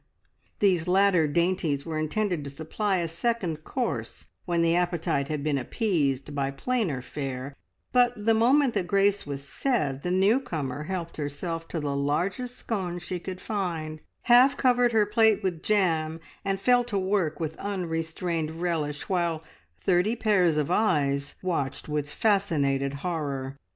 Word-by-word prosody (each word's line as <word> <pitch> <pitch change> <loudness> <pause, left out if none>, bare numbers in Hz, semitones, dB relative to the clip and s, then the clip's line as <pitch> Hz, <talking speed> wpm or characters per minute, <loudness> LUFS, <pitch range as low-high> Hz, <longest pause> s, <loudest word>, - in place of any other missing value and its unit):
These 180 -5 +2
latter 185 -3 +4
dainties 165 -2 0
were 160 -2 -3
intended 175 +1 -1
to - - -4
supply 175 +8 -1
a 170 -1 -1
second 170 -2 -2
course 255 +6 -3 0.2
when 170 -2 +1
appetite 170 -4 +1
had 150 -2 -3
been 145 -2 +1
appeased 145 - -1
by 140 -1 0
plainer 160 - -1
fare, 135 0 -5 0.4
but 245 -1 +4
the 225 - +5
moment 250 +4 +4
that 175 - -1
grace 200 -1 +2
was 140 -1 -5
said 150 - -1
the 180 - -3
new 195 +7 +4
comer 150 - -4
helped 175 -2 -4
herself 165 +3 -4
to 165 - -3
the 145 -2 -2
largest 180 - -1
scone 185 -6 -3
she 175 +1 -5
could 185 +1 -6
find, 170 -8 -3 0.2
half 255 +3 +6
covered 245 -2 +3
her 220 -2 +4
plate 215 0 +3
with 175 -4 -2
jam, 165 -6 +1 0.2
and 195 -1 -1
fell 245 +3 +4
to 220 -4 -2
work 185 -5 0
with 160 -1 -3
unrestrained 165 -3 -3
relish, 155 -4 -2
while 170 -4 0 0.4
thirty 185 - +2
pairs 190 -8 +3
of 150 +2 0
eyes 145 -9 +1
watched 155 -7 -2
with 150 -1 -2
fascinated 145 -9 +1
horror. 140 -6 -3
170 Hz, 150 wpm, -27 LUFS, 150-200 Hz, 0.4 s, half